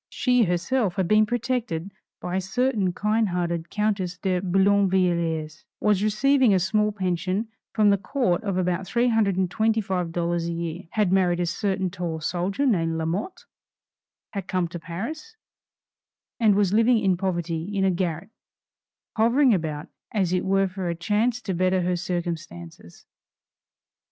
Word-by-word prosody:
She 250 -3 +2
herself 180 +4 0
had 190 -3 0
been 215 +2 +4
protected 235 -7 -2 0.3
by 180 0 -4
a - - 0
certain 205 0 0
kind 210 +3 0
hearted 170 -1 -2
Countess 200 -4 -1
de 185 -1 -1
Boulainvilliers; 180 -5 +1 0.2
was 210 -2 +2
receiving 235 +2 +3
a - - +3
small 210 +3 +1
pension 185 +2 -2 0.3
from 210 -2 +5
the 200 - +2
Court 200 -6 0
of 195 -3 -2
about 180 0 -1
$325 190 -6 0
a - - -2
year; 170 +1 -4
had 210 -4 +1
married 180 -2 +2
a 175 - +1
certain 190 +1 -1
tall 170 -3 -4
soldier 180 - -1
named 165 -9 +1
Lamotte; 170 - -3 0.9
had 195 -3 -5
come 185 -2 0
to 175 - -6
Paris, 230 - -6 1.0
and 215 -4 +4
was 200 -2 +2
living 230 +2 +4
in 195 -4 +2
poverty 175 -3 -2
in 195 - +2
a 190 - +3
garret, 175 +2 -3 0.9
hovering 240 +3 +4
about 155 -5 -2 0.2
as 190 -5 0
it 180 - 0
were 195 0 +2
for 185 -1 -4
a 170 - -2
chance 210 +8 0
to 195 - -2
better 185 +1 +1
her 180 +1 0
circumstances. 170 - -6
190 Hz, 145 wpm, -24 LUFS, 175-215 Hz, 1.0 s, from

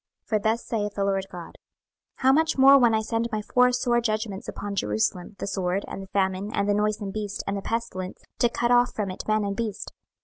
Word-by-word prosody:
26:014:021 - - -35
For 215 - +2
thus 220 +3 0
saith 210 -3 -2
the 200 - 0
Lord 195 -1 0
GOD; 175 -2 -9 0.6
How 260 0 +3
much 315 +2 +2
more 270 +1 +8
when 235 -3 +4
I 220 - +1
send 230 +1 -1
my 215 -1 -2
four 250 +3 +3
sore 245 -1 +1
judgments 215 -3 -2
upon 205 0 -5
Jerusalem, 175 - -1
the - - -4
sword, 195 0 -1
and - - -6
the 195 - -9
famine, 190 +1 -1
and 200 -2 0
the 205 - +3
noisome 210 -1 0
beast, 205 -1 -4
and 195 - -2
the 200 - -3
pestilence, 190 -5 -4 0.2
to 240 - +4
cut 235 +1 0
off 245 0 +4
from 205 -3 -2
it 185 - -6
man 215 0 +2
and 200 0 -2
beast? 215 -2 -4
210 Hz, 230 wpm, -25 LUFS, 195-235 Hz, 0.6 s, more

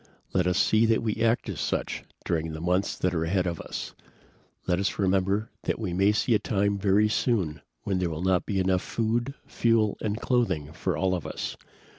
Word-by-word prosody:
"Let 90 -1 +2
us 90 0 +2
see 110 +3 +4
that 115 0 +2
we 110 -2 -1
act 115 +1 +2
as - - -4
such - - -2 0.2
during 80 -2 -1
the 80 - -5
months 90 +4 0
that 90 -1 0
are 80 -1 0
ahead 90 +2 +1
of 85 -3 -2
us. - - -6 0.7
Let 90 0 +1
us 100 - -1
remember 95 +2 +1
that - - 0
we 105 -6 -3
may 95 +3 +4
see 115 +3 +1
a 105 - +4
time 100 -1 0
very 100 +2 +4
soon 95 - 0 0.2
when 95 -2 0
there 90 -2 0
will 80 +1 -4
not 95 -1 +2
be 100 -2 0
enough 95 -1 +2
food, 120 +4 -1
fuel 115 -3 +1
and 105 +1 -2
clothing 110 - 0
for - - -2
all 95 -1 +1
of 90 -4 -3
us. - - -4
95 Hz, 205 wpm, -27 LUFS, 90-110 Hz, 0.7 s, see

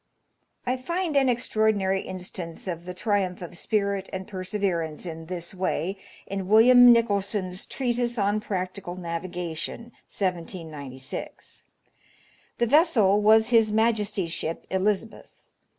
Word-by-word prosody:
I 250 +1 0
find 340 +4 -2
an 270 -2 +4
extraordinary 215 -5 +1
instance 180 -2 -7
of 170 -1 -4
the 180 - -5
triumph 195 -2 0
of 175 - -8
spirit 200 0 -1
and 190 0 -5
perseverance 185 -5 -2
in 165 -1 -7
this 175 0 -5
way 185 0 -2 0.3
in 195 -1 -4
William 245 +4 +8
Nichol 230 -4 +3
son's 190 -1 -4
"Treatise 240 -2 -1
on 205 0 +1
Practical 185 -2 -4
Navigation," 175 +5 -5 0.2
1796. 160 -8 -5 1.0
The 240 - +2
vessel 230 - +4
was 220 +2 +5
his 225 -3 +4
Majesty's 210 -5 +1
ship 165 0 -4
Elizabeth. 205 +3 -1
195 Hz, 120 wpm, -26 LUFS, 180-220 Hz, 1.0 s, William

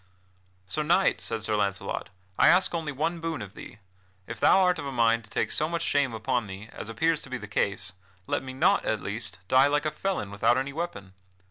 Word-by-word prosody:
"Sir 155 +11 -2
Knight," 175 +5 +2
said 115 -2 -2
Sir 110 - 0
Launcelot, 100 -1 -2 0.3
"I - - +5
ask 180 +1 +5
only 160 -3 -2
one 160 +5 -2
boon 165 -2 -3
of 105 -3 -8
thee; - - -11 0.5
if 115 0 -7
thou - - +6
art 180 -1 +3
of 140 - -4
a - - -3
mind 115 -2 +2
to - - -17
take - - -1
so 155 - +1
much 170 -1 -1
shame 145 -3 +2
upon 120 0 -1
thee, 100 +3 -9
as 110 - -7
appears 160 +7 +1
to - - -12
be 130 - -3
the 105 -3 -9
case, 100 -2 -1 0.3
let - - -1
me 130 0 -7
not, 130 - +3
at - - -1
least, 100 -4 -3
die 130 +2 +5
like 145 +1 +1
a 155 - +1
felon 185 - -3
without 100 +4 +2
any 135 +1 -2
weapon. 140 - -5
130 Hz, 225 wpm, -27 LUFS, 105-155 Hz, 0.5 s, thou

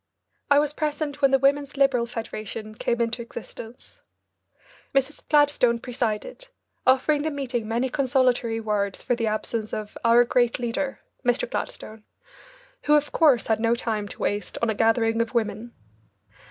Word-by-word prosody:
I 285 - +6
was 295 0 +2
present 295 -1 -3
when 275 - +5
the 270 - +4
Women's 280 +1 +1
Liberal 265 -4 +3
Federation 220 -2 -6
came 235 +2 -1
into 235 0 -1
existence. 230 0 -10 0.9
Mrs. 275 +2 0
Gladstone 290 -5 +4
presided, 245 - -3 0.4
offering 270 +3 +4
the 315 - -1
meeting 260 -6 -3
many 235 +4 0
consolatory 250 -3 +1
words 205 -3 -2
for - - +1
the 230 -1 -1
absence 215 0 -2
of 210 -1 -6
"our 235 +1 +6
great 240 -1 +1
leader," 250 +3 -3 0.2
Mr. 245 +1 +1
Gladstone, 215 0 -5 0.8
who 300 - +5
of 295 0 +1
course 280 -8 +4
had 220 -1 +1
no 230 +1 +2
time 215 -3 -2
to - - -11
waste 205 0 -2
on 230 - +3
a - - 0
gathering 225 +1 +2
of 230 +2 -3
women. 230 +1 -1
240 Hz, 155 wpm, -25 LUFS, 225-275 Hz, 0.9 s, I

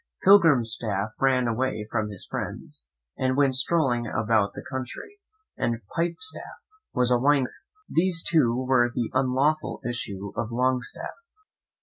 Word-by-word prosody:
Pilgrimstaff 115 - +4
ran 130 -2 +3
away 115 -1 -1
from 110 -2 -1
his 100 -3 -7
friends, - - -6 0.3
and 130 0 +1
went 140 -2 +3
strolling 130 -3 +1
about 110 -2 +1
the - - -9
country; 150 - -7 0.4
and 115 0 -1
Pipestaff 170 +9 -4 0.3
was 125 0 +1
a 120 - +4
wine 140 +1 +4
cooper. 125 - -5 0.3
These 170 0 +1
two 130 -6 +2
were 125 -2 +3
the 120 -1 -3
unlawful 135 +4 +1
issue 100 -5 -5
of 115 +1 -3
Longstaff. 125 +1 -1
125 Hz, 130 wpm, -26 LUFS, 115-145 Hz, 0.4 s, Pilgrimstaff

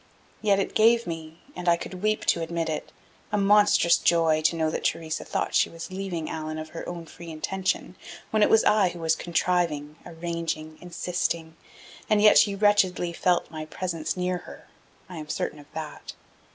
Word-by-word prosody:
Yet 205 -2 +3
it 195 - -1
gave 230 +2 +4
me, 165 -1 -7
and 175 0 -1
I 170 - +4
could 180 +1 -8
weep 215 +1 0
to 170 - +2
admit 165 0 -2
it, 155 - -4 0.4
a 210 - +1
monstrous 205 -3 +5
joy 165 -2 +3
to 165 - +3
know 160 -1 0
that - - -3
Theresa 160 -1 -1
thought - - -2
she - - +3
was 165 +3 -8
leaving 185 -4 -4
Allan 155 0 -4
of 155 0 -6
her 165 - -7
own 170 -1 -6
free 170 +2 -11
intention, 190 +4 -2 0.4
when 215 - +2
it - - +5
was 220 - +5
I 210 -3 +4
who 175 - -9
was 160 -1 +2
contriving, 165 -4 -1
arranging, 165 -2 -5
insisting.... 170 -2 -3 0.5
And 215 - +4
yet 210 0 +7
she 200 -2 +3
wretchedly 195 -4 +2
felt 175 +1 +1
my 155 -1 -6
presence 165 -1 -3
near 180 0 -1
her; - - -13 0.4
I 180 - -9
am 155 -1 -8
certain 155 - -3
of 145 - -15
that. 155 -1 -7
170 Hz, 185 wpm, -26 LUFS, 160-190 Hz, 0.5 s, yet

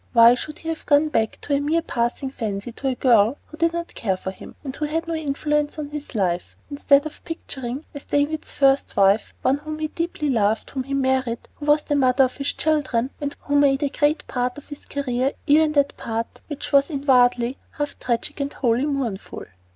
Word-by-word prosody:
Why 230 0 +8
should 300 +5 -5
he 325 - -6
have 325 - -5
gone 295 +1 +4
back 220 -6 0
to 290 - -2
a 280 - +3
mere 315 +3 +1
passing 245 +1 -2
fancy, 215 -3 -4
to 270 +4 -5
a 260 - +1
girl 235 0 +4
who 315 - -13
did 335 +1 +2
not 340 0 -5
care 190 -4 -1
for 190 - -5
him, - - -12
and 270 -2 -5
who 305 - -2
had 325 +3 -2
no 335 - -2
influence 295 -1 -1
on 300 -2 -4
his 295 -3 -7
life, 180 -4 -1 0.2
instead 285 0 +4
of 310 - -8
picturing, 270 -4 -6
as 285 - -9
David's 290 +2 0
first 275 0 +2
wife, 200 +2 +4
one 270 +2 +2
whom 305 +1 -6
he 310 0 -2
deeply 325 -3 -2
loved, 220 -2 +1
whom 260 -2 -3
he 275 +1 -2
married, 260 -3 0
who 295 - -7
was 295 0 +4
the 290 - -1
mother 265 -1 +4
of 255 -1 -1
his 275 0 -1
children, 275 -5 0
and 285 0 -3
who 285 - -2
made 280 0 +3
a 285 - +1
great 295 +2 +1
part 250 +1 -2
of 290 - -12
his 290 - -9
career, 265 -1 -1
even 305 0 +4
that 285 -1 +2
part 230 0 -4
which 295 -2 -5
was 280 +1 +4
inwardly 250 -4 +2
half 290 -1 -4
tragic 235 +2 -2
and 280 0 -2
wholly 245 +2 +1
mournful? 255 -9 -3
280 Hz, 215 wpm, -23 LUFS, 245-295 Hz, 0.2 s, Why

